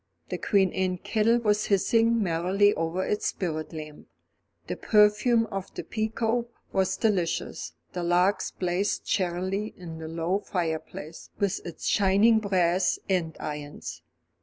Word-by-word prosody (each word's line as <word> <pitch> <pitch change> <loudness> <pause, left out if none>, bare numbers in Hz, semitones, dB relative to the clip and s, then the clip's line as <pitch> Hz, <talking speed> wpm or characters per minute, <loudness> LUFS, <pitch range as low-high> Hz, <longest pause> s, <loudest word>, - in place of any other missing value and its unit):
The - - -3
Queen 195 -4 +2
Anne 185 -1 0
kettle 220 +5 +2
was 210 -1 +2
hissing 225 +3 +3
merrily 190 +4 +3
over 165 +3 -1
its 210 - -1
spirit 155 -4 -3
lamp, 155 -2 -9 0.6
the - - -3
perfume 215 +2 +4
of 195 -1 -4
the - - -4
pekoe 225 +2 -1 0.3
was 190 -1 +1
delicious, 190 -7 -1 0.2
the 180 - -3
logs 180 +3 +2
blazed 185 +2 -1
cheerily 190 +3 -1
in 165 -3 -8
the 160 - -6
low 165 +4 -1
fireplace, 165 -4 -4
with 200 -2 -1
its 170 - -8
shining 205 +3 +4
brass 185 -3 +2
andirons. 150 - -3
190 Hz, 130 wpm, -27 LUFS, 170-210 Hz, 0.6 s, perfume